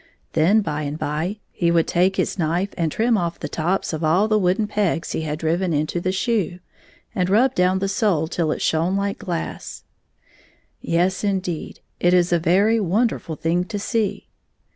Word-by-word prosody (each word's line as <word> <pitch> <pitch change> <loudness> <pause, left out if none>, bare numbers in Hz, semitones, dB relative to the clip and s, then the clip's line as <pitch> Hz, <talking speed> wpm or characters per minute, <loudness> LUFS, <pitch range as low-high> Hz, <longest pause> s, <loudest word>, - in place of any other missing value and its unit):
Then, 180 +8 +4
by 150 -6 -3
and 145 0 -4
by, 160 +7 -2
he 170 - 0
would 170 -1 +3
take 185 +2 +2
his - - -1
knife 175 +5 0
and 165 -3 -1
trim 225 +2 +2
off 170 -1 -3
the - - -4
tops 175 +2 -1
of 160 +1 -3
all 175 +7 +3
the 215 -1 +2
wooden 190 +3 +1
pegs 200 -6 -1
he - - -2
had 155 -1 -3
driven 170 +3 0
into 155 +3 -1
the 185 - 0
shoe, 190 -3 -1 0.6
and 180 -4 0
rub 240 +6 +4
down 180 -1 +2
the 195 +1 -1
sole 195 -6 +1
till 160 -1 -1
it - - -2
shone 170 +4 +1
Uke 200 - -5
glass. 175 -4 -5 1.0
Yes, 180 +4 0
indeed! 190 -5 -3 0.2
It 175 +1 +4
is 175 -1 +3
a 170 - +3
very 200 +7 +3
wonderful 205 -3 0
thing 170 +3 0
to 205 +2 -5
see. 205 -1 -2
180 Hz, 185 wpm, -22 LUFS, 165-200 Hz, 1.0 s, Then